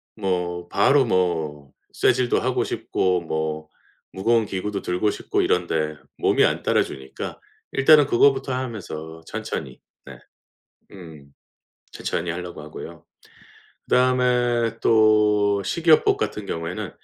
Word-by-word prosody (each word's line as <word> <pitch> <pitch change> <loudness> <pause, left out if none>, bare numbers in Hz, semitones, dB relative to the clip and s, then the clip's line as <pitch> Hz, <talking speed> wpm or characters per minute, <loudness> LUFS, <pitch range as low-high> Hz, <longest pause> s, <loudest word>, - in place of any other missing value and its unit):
뭐 90 -4 -2
바로 140 -1 +4
뭐 80 - -1 0.2
쇠질도 125 0 +2
하고 - - 0
싶고 90 -2 -1
뭐 80 -1 -3 0.4
무거운 115 +4 +1
기구도 100 +1 -4
들고 90 +4 0
싶고 - - -2
이런데 80 -3 0 0.2
몸이 - - +3
안 - - 0
따라 - - +2
주니까 65 0 -8 0.3
일단은 145 +1 +6
그거부터 135 +1 +3
하면서 90 -11 -6
천천히 65 -5 -6 0.2
네. 65 -3 -11 0.7
음 80 -7 -13 0.6
천천히 85 0 -3
하려고 85 -2 -6
하고요. 80 +2 -10 0.8
그다음에 125 -2 +2
또 105 -2 +3
식이요법 160 - +3
같은 105 - -3
경우에는 85 0 -4
95 Hz, 255 characters per minute, -23 LUFS, 80-120 Hz, 0.8 s, 일단은